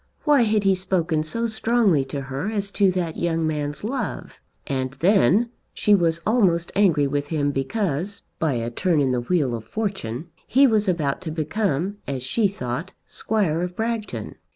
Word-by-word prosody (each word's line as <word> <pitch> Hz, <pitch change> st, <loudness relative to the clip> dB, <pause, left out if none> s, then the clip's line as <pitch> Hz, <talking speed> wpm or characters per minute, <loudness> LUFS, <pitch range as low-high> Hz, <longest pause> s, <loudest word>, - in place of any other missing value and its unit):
Why 295 Hz, -4 st, +5 dB
had 215 Hz, -2 st, +2 dB
he 195 Hz, -1 st, +4 dB
spoken 180 Hz, -4 st, 0 dB
so 230 Hz, +10 st, -2 dB
strongly 220 Hz, -, +2 dB
to 140 Hz, +1 st, -4 dB
her 135 Hz, +8 st, -4 dB
as 200 Hz, -2 st, -3 dB
to 200 Hz, -2 st, +3 dB
that 175 Hz, -3 st, -2 dB
young 165 Hz, -1 st, 0 dB
man's 150 Hz, 0 st, -3 dB
love? 240 Hz, -2 st, -4 dB, 0.2 s
And 130 Hz, -1 st, -2 dB
then 200 Hz, -, +3 dB, 0.2 s
she 210 Hz, -, +3 dB
was 170 Hz, -4 st, +2 dB
almost 185 Hz, -7 st, +2 dB
angry 170 Hz, -8 st, +4 dB
with 145 Hz, +1 st, -1 dB
him 145 Hz, -2 st, 0 dB
because, 180 Hz, +5 st, -2 dB, 0.2 s
by 160 Hz, -3 st, +1 dB
a 115 Hz, 0 st, -2 dB
turn 165 Hz, +5 st, +1 dB
in 135 Hz, -2 st, +2 dB
the 125 Hz, -1 st, 0 dB
wheel 140 Hz, -2 st, +1 dB
of 115 Hz, -2 st, -4 dB
fortune, 170 Hz, -, -4 dB, 0.2 s
he 270 Hz, +4 st, +5 dB
was 215 Hz, -5 st, +2 dB
about 155 Hz, -6 st, 0 dB
to 165 Hz, -4 st, -5 dB
become, 180 Hz, +3 st, -1 dB
as 135 Hz, -3 st, -3 dB
she 205 Hz, -, +2 dB
thought, 160 Hz, -1 st, -5 dB
Squire 190 Hz, -7 st, -1 dB
of 180 Hz, 0 st, -3 dB
Bragton. 220 Hz, -, -3 dB
175 Hz, 175 wpm, -23 LUFS, 145-205 Hz, 0.2 s, Why